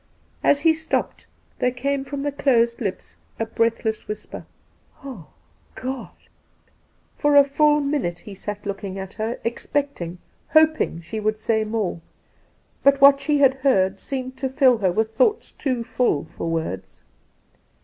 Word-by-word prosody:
As 285 Hz, -, +4 dB
he 325 Hz, +1 st, +5 dB
stopped 320 Hz, 0 st, -3 dB, 0.3 s
there 250 Hz, -, +2 dB
came 270 Hz, +2 st, -2 dB
from 275 Hz, 0 st, -5 dB
the 290 Hz, -, -1 dB
closed 235 Hz, -4 st, +2 dB
lips 195 Hz, -4 st, -5 dB, 0.2 s
a 225 Hz, -, 0 dB
breathless 225 Hz, -1 st, -1 dB
whisper—' 210 Hz, 0 st, -7 dB, 0.6 s
Ah, 245 Hz, -, -9 dB, 0.5 s
God 260 Hz, 0 st, -5 dB, 0.6 s
!' -, -, -39 dB
For 295 Hz, -1 st, +3 dB
a 285 Hz, -, +9 dB
full 295 Hz, +1 st, +3 dB
minute 280 Hz, -, -2 dB
he 210 Hz, -, -10 dB
sat 205 Hz, +2 st, -6 dB
looking 195 Hz, -1 st, -5 dB
at 190 Hz, 0 st, -7 dB
her, 225 Hz, +2 st, -3 dB
expect 280 Hz, +2 st, -2 dB
ing, 170 Hz, +1 st, -5 dB, 0.4 s
hoping 315 Hz, -, +3 dB
she 170 Hz, +7 st, -5 dB
would 215 Hz, 0 st, 0 dB
say 220 Hz, 0 st, 0 dB
more; 215 Hz, -6 st, -2 dB, 0.8 s
'but 280 Hz, 0 st, +4 dB
what 275 Hz, 0 st, +8 dB
she 300 Hz, 0 st, +1 dB
had 270 Hz, -1 st, +6 dB
heard 195 Hz, -8 st, +2 dB
seemed 260 Hz, -1 st, -5 dB
to 265 Hz, -, -2 dB
fill 255 Hz, -3 st, +4 dB
her 190 Hz, -3 st, +2 dB
with 220 Hz, +4 st, 0 dB
thoughts 440 Hz, -, +1 dB
too 255 Hz, -5 st, -2 dB
full 235 Hz, -, 0 dB
for 165 Hz, +1 st, -5 dB
words. 95 Hz, -, -4 dB
235 Hz, 155 wpm, -23 LUFS, 205-280 Hz, 0.8 s, a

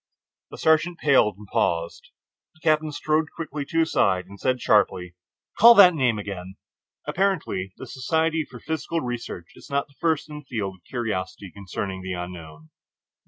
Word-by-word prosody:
The -, -, -10 dB
sergeant 160 Hz, +2 st, +2 dB
paled 130 Hz, -, +3 dB
and 105 Hz, -, -12 dB
paused. 85 Hz, -3 st, -1 dB, 0.5 s
The 155 Hz, -, -25 dB
captain 155 Hz, -1 st, +2 dB
strode 155 Hz, +1 st, 0 dB
quickly 150 Hz, -3 st, -5 dB
to 165 Hz, +3 st, +1 dB
his 160 Hz, -, 0 dB
side 95 Hz, -2 st, +2 dB
and 100 Hz, +1 st, -13 dB
said 130 Hz, -1 st, 0 dB
sharply: 90 Hz, -6 st, +2 dB, 0.5 s
"Call 235 Hz, +2 st, +10 dB
that 185 Hz, -4 st, +9 dB
name 125 Hz, -8 st, +1 dB
again." 95 Hz, -2 st, -6 dB, 0.5 s
Apparently 165 Hz, -, -1 dB
the -, -, -8 dB
Society 160 Hz, +4 st, 0 dB
for 125 Hz, -4 st, -12 dB
Psychical 160 Hz, +4 st, -3 dB
Research 120 Hz, -, -6 dB
is -, -, -15 dB
not 140 Hz, 0 st, -2 dB
first 160 Hz, -2 st, 0 dB
in 150 Hz, -1 st, -8 dB
the 150 Hz, -, -16 dB
field 100 Hz, -7 st, -4 dB
of 85 Hz, -, -37 dB
curiosity 100 Hz, -6 st, -4 dB
concerning 95 Hz, 0 st, -5 dB
the 95 Hz, 0 st, -4 dB
Unknown. 85 Hz, -3 st, -8 dB
125 Hz, 165 wpm, -24 LUFS, 95-155 Hz, 0.5 s, Call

